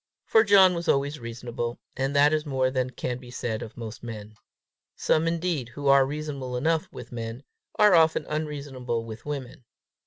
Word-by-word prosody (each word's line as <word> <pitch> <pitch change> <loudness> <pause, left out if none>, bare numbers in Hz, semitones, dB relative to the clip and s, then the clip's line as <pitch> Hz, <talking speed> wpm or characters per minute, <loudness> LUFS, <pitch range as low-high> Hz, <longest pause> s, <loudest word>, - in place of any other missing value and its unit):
For 220 - +5
John 195 -3 +7
was 170 0 -4
always 140 +2 +1
reasonable, 120 0 -5 0.2
and 135 +1 -1
that 145 +2 +5
is 155 -1 +1
more 130 -3 0
than 130 -1 0
can 125 0 -4
be 125 -1 -12
said 120 -2 -3
of 115 +1 -9
most 115 -2 -7
men. 110 -2 -8 0.6
Some, 160 +1 +2
indeed, 165 -6 -1
who 140 +3 -2
are 135 -1 +6
reasonable 140 -4 -4
enough 160 +4 +1
with 120 - -10
men, 115 +2 -6 0.3
are 210 -2 +6
often 160 -2 +4
unreasonable 140 -6 -3
with 115 +4 -9
women. 135 -3 -5
135 Hz, 175 wpm, -26 LUFS, 120-155 Hz, 0.6 s, John